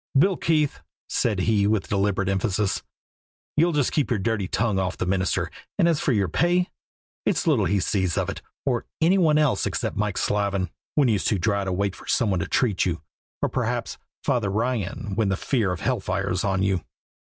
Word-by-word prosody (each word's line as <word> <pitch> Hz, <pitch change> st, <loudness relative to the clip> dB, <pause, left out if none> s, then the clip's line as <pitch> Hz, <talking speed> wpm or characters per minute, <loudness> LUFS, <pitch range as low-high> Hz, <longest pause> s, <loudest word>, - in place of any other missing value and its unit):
"Bill 185 Hz, +7 st, +4 dB
Keefe," 155 Hz, -4 st, +1 dB, 0.3 s
said 105 Hz, -5 st, 0 dB
he 105 Hz, -1 st, +2 dB
with 105 Hz, -2 st, +1 dB
deliberate 100 Hz, -1 st, +1 dB
emphasis, 100 Hz, +1 st, 0 dB, 0.7 s
"you'll 170 Hz, +3 st, +4 dB
just 145 Hz, -5 st, +1 dB
keep 150 Hz, -, +1 dB
your 120 Hz, -, +1 dB
dirty 105 Hz, -1 st, -1 dB
tongue 110 Hz, 0 st, 0 dB
off 95 Hz, -1 st, -2 dB
the -, -, -1 dB
minister; 95 Hz, 0 st, 0 dB, 0.3 s
and -, -, +4 dB
as 165 Hz, -3 st, +2 dB
for -, -, +1 dB
your 100 Hz, -5 st, +2 dB
pay, 175 Hz, -, +1 dB, 0.5 s
it's -, -, +1 dB
little 140 Hz, -, +3 dB
he 100 Hz, +4 st, +2 dB
sees 95 Hz, 0 st, 0 dB
of -, -, +1 dB
it, -, -, -5 dB, 0.2 s
or 125 Hz, -4 st, 0 dB
any 180 Hz, +4 st, +4 dB
one 155 Hz, -4 st, +4 dB
else 150 Hz, -4 st, +2 dB
except -, -, -2 dB
Mike 105 Hz, -2 st, -1 dB
Slavin, 100 Hz, -4 st, 0 dB, 0.2 s
when 145 Hz, -3 st, +4 dB
you's 105 Hz, -5 st, +1 dB
too 105 Hz, -, +2 dB
dry 100 Hz, +2 st, +1 dB
to 95 Hz, -, -1 dB
wait 100 Hz, +1 st, -1 dB
for -, -, -14 dB
some 115 Hz, -5 st, +2 dB
one 95 Hz, -, +1 dB
to -, -, -2 dB
treat 110 Hz, -8 st, +1 dB
you, 85 Hz, -3 st, -2 dB, 0.4 s
or -, -, +2 dB
perhaps -, -, -2 dB, 0.2 s
Father 115 Hz, -6 st, +1 dB
Ryan, 105 Hz, -2 st, -2 dB
when 105 Hz, 0 st, +1 dB
the 95 Hz, -, 0 dB
fear 110 Hz, -7 st, 0 dB
of 90 Hz, -, -4 dB
hell -, -, +1 dB
fire -, -, -2 dB
is 90 Hz, +1 st, 0 dB
on 95 Hz, -1 st, +1 dB
you." 95 Hz, -3 st, +1 dB
105 Hz, 205 wpm, -25 LUFS, 95-130 Hz, 0.7 s, Bill